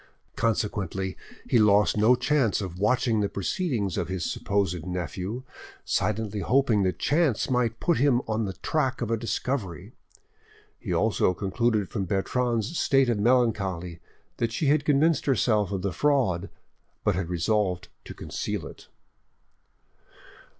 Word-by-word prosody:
Consequently 100 Hz, -4 st, -1 dB, 0.3 s
he 120 Hz, -, +3 dB
lost 105 Hz, -1 st, +4 dB
no 110 Hz, +4 st, +5 dB
chance 135 Hz, -5 st, +1 dB
of 90 Hz, -3 st, -6 dB
watching 115 Hz, +1 st, +2 dB
the 100 Hz, -1 st, 0 dB
proceedings 105 Hz, -, -2 dB
of -, -, -2 dB
his 95 Hz, -2 st, -3 dB
supposed 95 Hz, -5 st, -1 dB
nephew, 90 Hz, -, -4 dB, 0.4 s
silently 110 Hz, -1 st, -1 dB
hoping 120 Hz, 0 st, +2 dB
that 90 Hz, -3 st, 0 dB
chance 145 Hz, -, +1 dB
might 120 Hz, -3 st, 0 dB
put 170 Hz, -6 st, +1 dB
him 135 Hz, -3 st, +4 dB
on 110 Hz, 0 st, -1 dB
the 95 Hz, -, -4 dB
track 135 Hz, -5 st, 0 dB
of 115 Hz, -1 st, -2 dB
a -, -, +3 dB
discovery. 115 Hz, -, -3 dB, 0.9 s
He -, -, -5 dB
also 90 Hz, -, +2 dB
concluded 105 Hz, +1 st, 0 dB
from 95 Hz, -, -3 dB
Bertrande's 120 Hz, -, -1 dB
state 135 Hz, -2 st, +3 dB
of 110 Hz, -, -1 dB
melancholy 100 Hz, -8 st, +1 dB, 0.4 s
that 115 Hz, -1 st, -1 dB
she 150 Hz, -, -2 dB
had 145 Hz, 0 st, +2 dB
convinced 150 Hz, +1 st, +2 dB
herself 110 Hz, -6 st, +2 dB
of 95 Hz, -2 st, -3 dB
the 100 Hz, -3 st, -1 dB
fraud, 105 Hz, -, +1 dB, 0.5 s
but 105 Hz, -, +2 dB
had 90 Hz, -1 st, -3 dB
resolved 90 Hz, +1 st, 0 dB, 0.2 s
to -, -, -9 dB
conceal -, -, -4 dB
it. -, -, -12 dB
110 Hz, 140 wpm, -26 LUFS, 95-125 Hz, 0.9 s, no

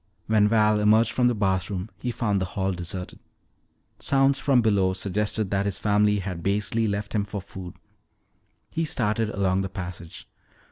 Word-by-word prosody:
When 105 Hz, -1 st, +3 dB
Val 105 Hz, -1 st, +3 dB
emerged 110 Hz, +2 st, +4 dB
from 125 Hz, -1 st, +2 dB
the 120 Hz, -, +1 dB
bathroom 95 Hz, 0 st, -1 dB
he 125 Hz, -, -3 dB
found 110 Hz, -4 st, 0 dB
the -, -, 0 dB
hall 95 Hz, 0 st, +1 dB
deserted. 90 Hz, +1 st, -6 dB, 0.8 s
Sounds 135 Hz, 0 st, +3 dB
from 130 Hz, -4 st, +3 dB
below 100 Hz, -4 st, +2 dB
suggested 100 Hz, +2 st, -2 dB
that 100 Hz, 0 st, +1 dB
his 100 Hz, -, -2 dB
family 105 Hz, 0 st, +2 dB
had 95 Hz, -3 st, -4 dB
basely 105 Hz, +4 st, 0 dB
left 100 Hz, 0 st, -3 dB
him 105 Hz, -2 st, +1 dB
for 100 Hz, 0 st, -5 dB
food. 90 Hz, -2 st, -9 dB, 1.0 s
He 165 Hz, -, -1 dB
started 110 Hz, -7 st, 0 dB
along 95 Hz, -2 st, 0 dB
the 95 Hz, -, -3 dB
passage. 90 Hz, -3 st, -8 dB
105 Hz, 160 wpm, -25 LUFS, 95-110 Hz, 1.0 s, emerged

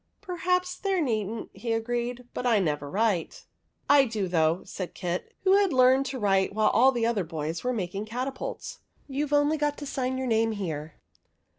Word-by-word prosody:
'' -, -, -47 dB
Perhaps 360 Hz, -1 st, -1 dB
there 390 Hz, -2 st, 0 dB
needn't," 220 Hz, -, -2 dB
he 230 Hz, -1 st, -3 dB
agreed. 240 Hz, +2 st, -2 dB
"But 250 Hz, -, -2 dB
I 230 Hz, -3 st, +4 dB
never 150 Hz, -6 st, -1 dB
write." 200 Hz, -2 st, -1 dB, 0.2 s
" -, -, -45 dB
I 285 Hz, -1 st, +6 dB
do, 215 Hz, -5 st, -2 dB
though," 165 Hz, 0 st, +1 dB
said 185 Hz, -3 st, -6 dB
Kit, 180 Hz, -1 st, -3 dB
who 385 Hz, +1 st, +5 dB
had 400 Hz, -3 st, +3 dB
learned 260 Hz, +1 st, +4 dB
to 265 Hz, -, -4 dB
write 195 Hz, -3 st, +1 dB
while 215 Hz, 0 st, +4 dB
all 255 Hz, +5 st, +5 dB
the 240 Hz, -3 st, 0 dB
other 230 Hz, -4 st, +1 dB
boys 160 Hz, 0 st, -4 dB
were 250 Hz, -, 0 dB
making 200 Hz, -2 st, -3 dB
catapults; 255 Hz, +4 st, -5 dB
" -, -, -38 dB
you 285 Hz, +2 st, -2 dB
Ve 290 Hz, -, +1 dB
only 290 Hz, +2 st, +3 dB
got 295 Hz, -1 st, 0 dB
to 290 Hz, -, -6 dB
sign 260 Hz, -2 st, -2 dB
your 260 Hz, -, -2 dB
name 225 Hz, -2 st, +2 dB
here." 160 Hz, -6 st, -5 dB
235 Hz, 200 wpm, -27 LUFS, 195-275 Hz, 0.2 s, I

